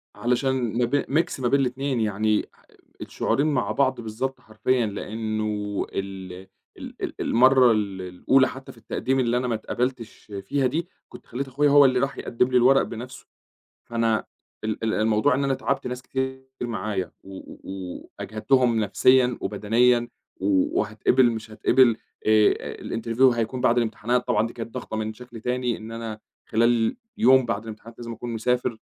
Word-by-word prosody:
علشان 125 +5 0 0.3
م - - +4
ب 140 +4 +1
mix 155 0 0
ما 125 - 0
بين 140 +3 +3
الاتنين 130 0 -1
يعني، 105 0 +1 0.6
الشعورين 145 +3 0
مع 140 -4 0
بعض 130 -3 +1
بالضبط 120 +4 -4
حرفيًا، 120 +1 0
لأنه 105 -1 -3
ال 95 -1 -5 0.4
ال - - -9
ال - - -3
المرّة 130 0 +5
ال 100 -3 -1
الأولى 90 +9 +2
حتى 130 0 -9
في - - -19
التقديم 130 +4 -1
اللي 120 -1 +1
أنا 125 0 -1
ما 115 - 0
اتقَبلتش 120 0 -4
فيها 135 +7 0
دي، 165 +7 -2 0.2
كُنت - - -13
خليت 135 +3 -4
أخويا 145 +3 +2
هو 145 0 +7
اللي 130 -1 +3
راح 140 +1 -1
يقدّم 125 +1 0
لي 125 - +4
الورق 130 +2 +5
بنَفْسه، 125 +3 -7 0.6
فأنا 115 -2 0 0.4
ال 110 +1 -2
ال 110 - 0
الموضوع 110 +5 +2
إن 140 - 0
أنا 135 -1 +1
تعبت - - -2
ناس 125 0 -4
كتير 130 0 -3 0.2
معايا 110 -5 -3
و 95 0 -10
و 95 -2 -9
وأجهدتهم 115 +3 +1
نَفْسيًا 125 +4 +3
وبدنيًا، 120 +4 +2 0.3
و 95 -1 +1
وهاتقبل 115 +4 +2
مش 110 -1 -6
هاتقبل، 120 +1 +4 0.3
آآ 110 -1 +3
الinterview 115 +2 -3
هيكون 120 +2 -2
بعد 125 -1 +3
الامتحانات 120 +1 0
طبعًا 105 +2 +2
دي 115 - -8
كانت 115 -1 -8
ضغطة 110 - -5
من 110 0 -2
شكل 120 0 -11
تاني 125 0 -1
إن 110 +1 -9
أنا، 115 -2 -6 0.3
خلال 115 0 +2 0.2
يوم 130 0 +5
بعد 105 -2 -2
الامتحانات 115 +1 -10
لازم 115 -1 -6
أكون 120 +1 -6
مسافر، 120 0 -1
120 Hz, 165 wpm, -24 LUFS, 110-130 Hz, 0.6 s, هو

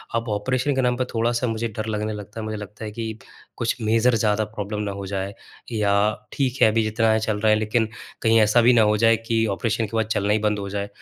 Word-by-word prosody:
अब 115 0 -1
ऑपरेशन 130 +6 0
के 130 - +2
नाम 125 -1 +2
पे 130 - 0
थोड़ा-सा 115 +2 0
मुझे 115 0 -2
डर 110 - -2
लगने 110 0 -2
लगता 105 +1 -8
है। - - -4
मुझे 110 0 -4
लगता 105 +1 -8
है 105 - -5
कि 110 0 -5 0.4
कुछ 115 0 0
मेजर 115 +2 +3
ज़्यादा 110 -1 +1
प्रॉब्लम 105 0 -4
ना 100 - -3
हो 100 - -5
जाए 95 0 -3 0.4
या 105 -3 +1 0.4
ठीक 135 -2 -1
है - - +8
अभी 115 +1 +2
जितना 110 +1 +1
है 110 - +3
चल 110 -1 -1
रहा 110 +1 +3
है 110 - +4
लेकिन, 110 +1 +1 0.3
कहीं 115 0 +4
ऐसा 110 +3 +4
भी 120 +2 +5
ना 115 - +5
हो 105 - +1
जाए 115 0 +5
कि 115 -1 +2
ऑपरेशन 115 -1 0
के 110 +2 -4
बाद 110 - +2
चलना 105 +1 +1
ही 110 - +2
बंद 105 -1 -2
हो 100 0 -5
जाए। 100 0 -3
110 Hz, 255 wpm, -23 LUFS, 105-115 Hz, 0.4 s, है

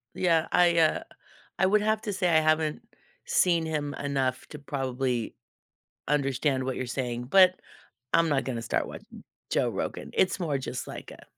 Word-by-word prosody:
Yeah. 165 -3 +2
I, 175 -1 +4
uh, 160 -1 +3 0.6
I 190 - +4
would 210 +3 +3
have 215 0 +1
to 210 - -3
say 185 -2 0
I 160 -1 +5
haven't 155 -1 +1 0.4
seen 170 -3 +2
him 150 -2 -2
enough 135 -2 -2
to 150 - -9
probably 130 -4 -2 0.7
understand 135 -1 +1
what 130 0 -2
you're 130 - -3
saying, 125 -1 -3
but 185 +6 +5 0.5
I'm 165 -1 +4
not 140 -2 +1
gonna 120 -3 -3
start 115 - -1
watching - - -11 0.3
Joe - - +2
Rogan, - - -4
it's 185 +1 +2
more 155 -6 -1
just 130 -1 -5
like - - -8
a, - - -13
150 Hz, 170 wpm, -27 LUFS, 130-170 Hz, 0.7 s, I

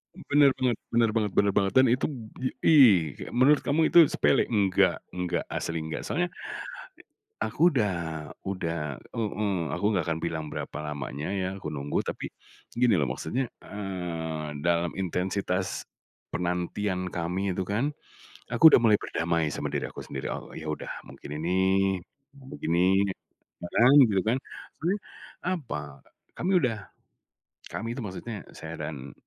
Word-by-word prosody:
M - - -11
bener 145 -1 +6
bener 125 -2 +2 0.2
bener 115 -1 +4
banget 105 -3 +1
bener 100 +1 +3
banget. 95 -1 +3
Dan 130 - +7
itub 125 +5 +1 0.5
ih, 105 - +6
kayak - - -8
menurut 135 +4 +5
kamu 155 +3 +3
itu - - +7
sepele, 135 - +3
enggak 100 -4 +3 0.2
enggak, 90 -1 -2
asli 80 0 -3
enggak. 80 0 -4
Soalnya, 175 +3 0 1.1
aku 175 0 +3
udah 105 -7 +2 0.5
udah 85 -7 -3
heeh, 105 -2 -2 0.2
aku 90 +3 -2
nggak 90 -6 0
akan 80 -1 -1
bilang 80 -2 -2
berapa - - -5
lamanya, 75 +3 -4
ya, 95 -2 -1
aku 75 -5 -6
nunggu, 70 0 -2
tapi - - -4 0.5
gini 120 -2 +4
loh 65 - 0
maksudnya, 115 - -2 0.2
eee, 80 -7 -4
dalam 85 +1 +1
intensitas 95 0 -2 0.4
penantian 90 +2 -2
kami 90 +2 -2 0.2
itu, 95 - 0
kan, 110 +9 0 0.6
aku 125 +7 +9
udah - - +3
mulai 110 -3 +5
berdamai 85 -1 0
sama - - -4
diri - - -2
aku - - -9
sendiri, 65 -1 -5
oh, - - -6
ya, 80 - -7
udah 75 - -4 0.2
mungkin - - -11
ini 85 +3 -1 1.0
begini, 95 +4 +2 0.5
kadang 120 +9 +4
gitu, 100 -5 +2
kan. 115 +3 +3 0.4
Soalnya 180 +6 0 0.5
apa, 145 - -2 0.6
kami 180 - -1
udah 125 -6 +1 0.9
kami, 115 +2 -4
tuh, 125 - -4
maksudnya 105 +2 -6
saya - - -7
dan 70 -4 -8
95 Hz, 145 wpm, -27 LUFS, 85-115 Hz, 1.1 s, aku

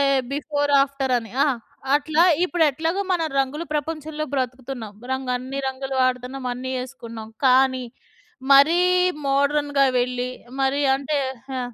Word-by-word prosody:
అంటే, - - +4 0.3
before, 290 0 -1
after 275 -1 -2
అని. 225 -1 -9
ఆ! - - +2 0.5
అట్లా 310 +3 +1 0.2
ఇప్పుడు 350 -2 0
ఎట్లాగో 325 +7 -1
మన 345 -2 +1 0.2
రంగులు 275 +4 -1
ప్రపంచంలో 305 0 -3
బ్రతుకుతున్నాం. 255 -3 -4 0.2
రంగ్ 260 -1 -2
అన్ని 260 +2 -6
రంగులు 265 0 -5
వాడుతున్నాం 255 +1 -1
అన్నీ 255 +1 -5
ఏసుకున్నాం. 230 -4 -9 0.2
కానీ, 260 0 +4 0.7
మరీ 305 +6 +6 0.5
మోడర్న్‌గా 285 0 +2 0.2
వెళ్ళి, 250 0 -2 0.3
మరి 275 +2 +1
అంటే 280 +2 -1 0.4
ఆ! - - -1
270 Hz, 130 wpm, -23 LUFS, 255-295 Hz, 0.7 s, మరీ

